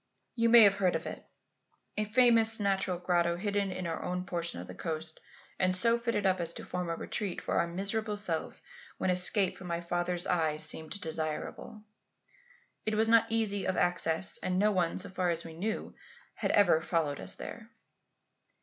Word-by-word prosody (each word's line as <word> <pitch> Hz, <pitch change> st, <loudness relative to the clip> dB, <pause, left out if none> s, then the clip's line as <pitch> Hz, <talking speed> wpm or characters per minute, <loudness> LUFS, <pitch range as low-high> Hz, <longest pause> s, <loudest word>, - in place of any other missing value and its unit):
You 230 Hz, -1 st, +1 dB
may 235 Hz, -1 st, +9 dB
have 200 Hz, -1 st, +5 dB
heard 185 Hz, -3 st, +1 dB
of -, -, -3 dB
it, -, -, -6 dB, 0.7 s
a 215 Hz, -, 0 dB
famous 225 Hz, 0 st, +5 dB
natural 195 Hz, -3 st, 0 dB
grotto 175 Hz, -1 st, +1 dB
hidden 200 Hz, +1 st, -1 dB
in 180 Hz, -1 st, -5 dB
our 165 Hz, -1 st, -3 dB
own 180 Hz, 0 st, -3 dB
portion 170 Hz, -2 st, -4 dB
of -, -, -7 dB
the -, -, -10 dB
coast 160 Hz, -1 st, -5 dB, 0.4 s
and 185 Hz, -1 st, +2 dB
so 230 Hz, +5 st, +3 dB
fitted 230 Hz, -4 st, -1 dB
up 185 Hz, -1 st, +2 dB
as 170 Hz, -1 st, -1 dB
to -, -, -8 dB
form 180 Hz, -1 st, -4 dB
a 165 Hz, -, -1 dB
retreat 195 Hz, +2 st, -3 dB
for -, -, -4 dB
our 170 Hz, -, +1 dB
miserable 205 Hz, +4 st, -2 dB
selves 175 Hz, -6 st, -1 dB, 0.3 s
when 185 Hz, -, 0 dB
escape 180 Hz, +1 st, +3 dB
from 185 Hz, -, -10 dB
my 170 Hz, -1 st, -2 dB
father's 175 Hz, +1 st, -1 dB
eye 160 Hz, -4 st, 0 dB
seemed 160 Hz, +4 st, -2 dB
desirable. 160 Hz, +5 st, -4 dB, 1.0 s
It 215 Hz, 0 st, -1 dB
was 220 Hz, +1 st, +2 dB
not 230 Hz, -1 st, +5 dB
easy 220 Hz, -3 st, 0 dB
of 185 Hz, -, -1 dB
access, 175 Hz, 0 st, +2 dB
and 180 Hz, 0 st, -2 dB
no 210 Hz, +2 st, +3 dB
one, 180 Hz, -4 st, 0 dB
so 190 Hz, -, -3 dB
far 185 Hz, -1 st, -1 dB
as 170 Hz, 0 st, -2 dB
we 165 Hz, -, -9 dB
knew, 210 Hz, +7 st, -4 dB, 0.4 s
had -, -, -3 dB
ever 175 Hz, -6 st, +4 dB
followed 160 Hz, -4 st, -1 dB
us -, -, -1 dB
there. 230 Hz, -1 st, -9 dB
185 Hz, 185 wpm, -30 LUFS, 170-210 Hz, 1.0 s, may